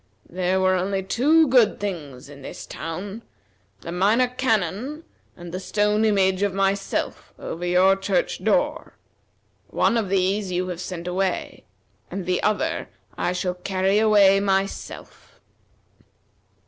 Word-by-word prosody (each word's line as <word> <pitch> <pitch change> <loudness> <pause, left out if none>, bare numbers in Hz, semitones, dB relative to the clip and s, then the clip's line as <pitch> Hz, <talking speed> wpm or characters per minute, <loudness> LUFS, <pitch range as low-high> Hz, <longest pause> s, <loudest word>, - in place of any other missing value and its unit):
There 185 +1 0
were 185 0 +3
only 190 +1 -1
two 300 +11 +3
good 245 -4 +4
things 150 -11 -5
in 140 -1 -12
this - - -8
town: 195 +7 -6 0.6
the 170 - -7
Minor 210 +8 +3
Canon 250 - -1 0.3
and 175 -1 -9
the 185 - -4
stone 210 +3 +1
image 190 -3 +2
of 200 -2 0
myself 195 0 -1
over 170 - -6
your 180 +2 +4
church 195 - -1
door. - - 0 0.7
One 235 - +1
of 215 -4 -1
these 195 +1 0
you 180 +1 -1
have 180 -1 -5
sent 180 -1 -6
away, 185 +1 -2 0.4
and 195 -2 -5
the 180 0 0
other 310 +11 -1 0.3
I - - -1
shall 180 0 -2
carry 190 +2 0
away 205 -3 +5
myself." 195 0 -3
195 Hz, 135 wpm, -23 LUFS, 180-210 Hz, 0.7 s, away